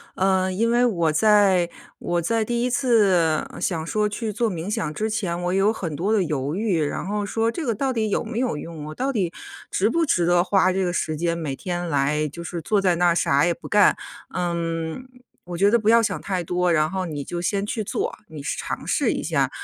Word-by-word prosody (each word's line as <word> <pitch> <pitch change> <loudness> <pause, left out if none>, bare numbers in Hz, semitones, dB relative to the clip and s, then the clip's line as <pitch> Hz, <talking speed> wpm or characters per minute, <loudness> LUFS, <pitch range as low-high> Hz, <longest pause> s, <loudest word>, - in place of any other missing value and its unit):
呃， 190 0 +2
因 225 +5 +1
为 245 +1 +4
我 170 -9 +1
在 195 -1 +4 0.3
我 175 0 -1
在 225 +5 0
第 240 +1 -1
1 250 - +1
次 200 - +2
想 160 -3 -1
说 210 +2 +1
去 215 +1 -3
做 230 +1 0
冥 175 +2 -5
想 155 -7 -2
之 220 +8 -2
前， 180 -5 -2
我 180 - 0
有 195 +3 +3
很 165 -8 -4
多 195 +7 0
的 210 - +3
犹 145 -3 -2
豫， 190 -5 0
然 145 - -3
后 205 0 -2
说 225 +2 0
这 320 +5 -4
个 235 - +1
到 265 +5 -1
底 220 -4 -1
有 - - 0
没 225 0 -6
有 250 -11 0
用， 155 -1 -7
我 155 - -7
到 270 +2 -1
底 190 -8 -1 0.4
值 205 +3 +2
不 330 +5 +1
值 175 - +2
得 175 0 +4
花 185 0 +3
这 190 +1 0
个 175 -1 -1
时 155 -2 -1
间 170 +1 0
每 145 -5 -3
天 175 +1 -4
来 150 +1 +1
就 170 +4 -8
是 170 0 -5
坐 205 +6 +1
在 180 -3 +3
那 175 +1 +3
儿 170 - +3
啥 140 -2 +3
也 175 - +2
不 - - -11
干？ 205 -1 +5 0.4
嗯， 170 +4 -2 0.4
我 175 -1 -6
觉 200 +3 +4
得 235 - +4
不 215 0 +1
要 230 0 +6
想 - - -1
太 185 -3 -2
多， 180 +1 0
然 155 -1 +2
后 190 -1 -2
你 145 -3 -4
就 175 +3 -5
先 200 +3 -1
去 215 +1 -3
做， - - -3
你 150 -3 -9
试 - - -2
尝 - - -4
试 - - +1
一 - - -3
下。 - - +1
185 Hz, 250 characters per minute, -23 LUFS, 165-215 Hz, 0.4 s, 要